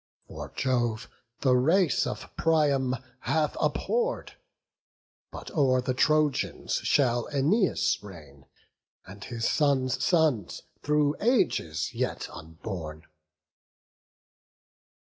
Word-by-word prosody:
For - - -8
Jove 120 -4 0 0.3
the 130 -2 +4
race 160 +7 +3
of - - -7
Priam 145 -5 +2 0.2
hath 155 +2 0
abhorr'd; 485 +1 -1 1.0
But - - -9
o'er 130 -4 +3
the 130 0 -1
Trojans 150 +1 +1
shall 120 -4 +2
Æneas 160 - +2
reign, 75 -9 -13 0.6
And 100 +2 -11
his 115 -2 -2
sons' 135 -4 +1
sons, 155 - +1 0.2
through 150 0 +1
ages 85 - +1
yet - - -2
unborn." 80 -1 -8
130 Hz, 90 wpm, -27 LUFS, 110-155 Hz, 1.0 s, the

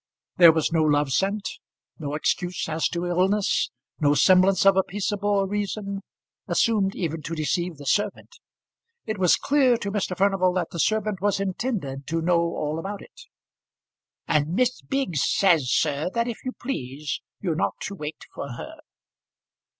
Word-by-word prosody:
There 170 -3 +9
was 160 0 0
no 165 -1 +2
love 145 -2 +2
sent, 200 +6 0 0.5
no 145 -2 -4
excuse 175 +3 -1
as 160 0 0
to 175 +1 -3
illness, 190 +3 +1 0.3
no 145 -1 +3
semblance 185 +5 +5
of 195 -1 +7
a 190 - +5
peaceable 205 +1 -1
reason, 200 0 -3 0.5
assumed 205 -4 +2
even 165 -2 -3
to 165 +3 -5
deceive 170 +2 -1
the 145 - -10
servant. 205 +8 -1 0.7
It 215 -2 -4
was 180 -2 +5
clear 270 -4 +3
to 200 -3 -4
Mr. 195 -3 -2
Furnival 195 -2 +2
that 180 -3 -2
the 170 - -6
servant 215 -1 0
was 205 -1 +1
intended 185 - -3
to 165 +2 -1
know 170 +1 +2
all 160 -2 -2
about 200 +3 -6
it. - - -16 1.1
"And 155 +2 +1
Miss 250 +2 +1
Biggs 265 - -1
says, 165 -10 +3
sir, 150 +2 +1
that 235 0 +1
if 235 - -6
you 255 - -4
please 145 - -4 0.2
you're 175 -5 -1
not 155 - -1
to 195 - -4
wait 150 -4 -7
for 140 -3 -6
her." 315 - -8
185 Hz, 160 wpm, -25 LUFS, 160-205 Hz, 1.1 s, There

